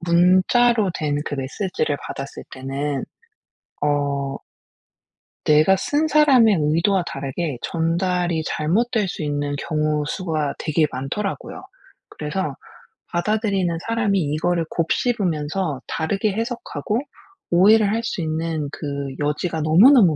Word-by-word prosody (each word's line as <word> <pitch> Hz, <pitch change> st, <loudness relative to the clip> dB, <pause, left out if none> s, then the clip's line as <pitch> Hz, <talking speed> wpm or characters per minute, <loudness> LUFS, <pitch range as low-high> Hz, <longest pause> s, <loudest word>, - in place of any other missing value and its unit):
문자로 185 Hz, +6 st, +4 dB
된 145 Hz, -2 st, -1 dB
그 -, -, -3 dB
메시지를 145 Hz, +2 st, -2 dB
받았을 135 Hz, +1 st, -7 dB
때는 135 Hz, +1 st, -3 dB, 0.8 s
어 140 Hz, -2 st, 0 dB, 1.1 s
내가 155 Hz, +5 st, +5 dB
쓴 295 Hz, +10 st, 0 dB
사람의 265 Hz, -, +5 dB
의도와 170 Hz, +6 st, +2 dB
다르게 140 Hz, +1 st, -3 dB
전달이 170 Hz, 0 st, 0 dB
잘못될 205 Hz, +6 st, 0 dB
수 170 Hz, -, -5 dB
있는 145 Hz, -1 st, -2 dB
경우 150 Hz, 0 st, -1 dB
수가 155 Hz, -5 st, -2 dB
되게 155 Hz, 0 st, +1 dB
많더라고요. 135 Hz, +11 st, -4 dB, 0.5 s
그래서 150 Hz, 0 st, -3 dB, 0.6 s
받아들이는 190 Hz, -1 st, 0 dB
사람이 225 Hz, -4 st, +1 dB
이거를 165 Hz, +2 st, 0 dB
곱씹으면서 165 Hz, -, -1 dB
다르게 195 Hz, +5 st, -1 dB
해석하고 225 Hz, -, -3 dB, 0.5 s
오해를 205 Hz, +4 st, +5 dB
할 230 Hz, +1 st, -1 dB
수 195 Hz, -, -3 dB
있는 160 Hz, -1 st, -2 dB
그 150 Hz, -, -6 dB, 0.3 s
여지가 155 Hz, +2 st, -1 dB
너무너무 180 Hz, -, +6 dB
170 Hz, 260 characters per minute, -22 LUFS, 150-200 Hz, 1.1 s, 너무너무